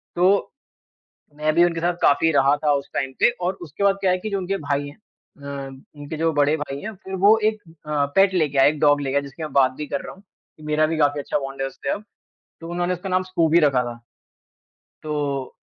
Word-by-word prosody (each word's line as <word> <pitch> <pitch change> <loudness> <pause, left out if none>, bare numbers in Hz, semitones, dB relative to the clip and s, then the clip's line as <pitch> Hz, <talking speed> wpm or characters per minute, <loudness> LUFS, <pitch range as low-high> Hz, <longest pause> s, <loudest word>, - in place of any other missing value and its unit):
तो 185 +3 +2 0.8
मैं 155 +1 0
भी 170 - +6
उनके 170 -1 -1
साथ 175 +1 +1
काफ़ी 160 +3 +4
रहा 140 0 +4
था 150 - +3
उस 140 0 -2
टाइम 135 -1 -2
पे - - +5
और 180 +2 0
उसके 165 +3 -6
बाद 200 -1 +4
क्या 190 -2 +3
है 180 - +2
कि 215 - -5
जो 200 - -1
उनके 195 +1 -2
भाई 145 -3 -2
हैं। 145 - -11
अ, 140 -9 -10 0.3
उनके 145 +2 -7
जो 165 +1 +1
बड़े 145 +1 +3
भाई 140 -2 -5
हैं, 220 - -6
फिर 190 0 -7
वो 220 +2 +7
एक 215 -1 -8 0.3
अ, 150 -2 +1
पेट 195 0 +5
लेके 155 -6 0
आए, 135 +1 +6
एक 150 0 -4
डॉग 145 -1 +4
लेके 135 0 -2
आए, - - +2
जिसकी 140 +3 -9
मैं 155 - -5
बात 135 -2 +4
भी 150 -1 -5
कर 140 - -3
रहा - - -9
हूँ 195 - -19
कि 160 -5 -23
मेरा 150 0 +2
भी 160 - -2
काफ़ी 145 -1 +2
अच्छा 145 - -2
बॉन्ड 135 -1 -6
है 135 - 0
उससे 135 +1 -7
अब, 205 - -2 0.6
तो 165 - -8
उन्होंने 175 +1 -1
उसका 180 +2 -7
नाम 185 0 +1
स्कूबी 170 -3 +2
रखा 140 -5 +3
था, 120 -1 -6 1.1
तो 145 -3 -3
150 Hz, 235 wpm, -22 LUFS, 140-180 Hz, 1.1 s, वो